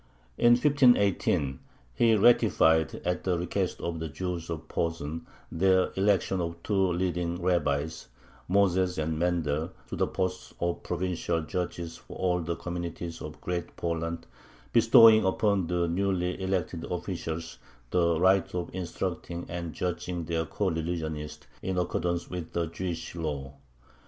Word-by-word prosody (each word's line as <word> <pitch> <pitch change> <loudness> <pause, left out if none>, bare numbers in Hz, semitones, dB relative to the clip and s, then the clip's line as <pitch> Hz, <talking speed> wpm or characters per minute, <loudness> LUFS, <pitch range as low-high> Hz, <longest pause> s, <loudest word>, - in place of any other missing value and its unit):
In 120 0 +7
1518 100 - +3 0.3
he 115 - +4
ratified, 80 -8 +4
at 90 +1 -1
the 90 -2 +1
request 90 +2 -2
of 85 -1 -3
the 80 0 -4
Jews 85 +1 -4
of 80 -2 -5
Posen, 80 -1 -3 0.2
their 95 +2 +3
election 95 -1 +2
of 85 0 -3
two 95 -3 +2
leading 85 -1 -1
rabbis, 80 -4 0 0.4
Moses 95 -1 +2
and 80 0 -1
Mendel, 80 -2 0 0.2
to - - -4
the - - +1
posts 90 0 -3
of 85 0 -1
provincial 85 -2 -1
judges 85 +1 -4
for - - -11
all 90 -1 +1
the 85 +1 -2
communities 85 -1 -5
of 75 0 -8
Great 90 -1 -4
Poland, 85 0 -3 0.5
bestowing 115 -1 +8
upon 95 -1 +1
the 85 0 +1
newly 90 0 0
elected 95 -3 -1
officials 85 -2 -4 0.3
the 85 -2 +2
right 95 0 +4
of 90 -1 -3
instructing 90 -1 -4
and 85 -1 -4
judging 90 +1 -3
their 80 0 -1
coreligionists 80 -4 -3 0.2
in 95 -1 -2
accordance 85 -1 -1
with 90 -3 -6
the 85 -1 0
Jewish 85 +1 -5
law. 75 -5 -4
85 Hz, 135 wpm, -28 LUFS, 80-95 Hz, 0.5 s, bestowing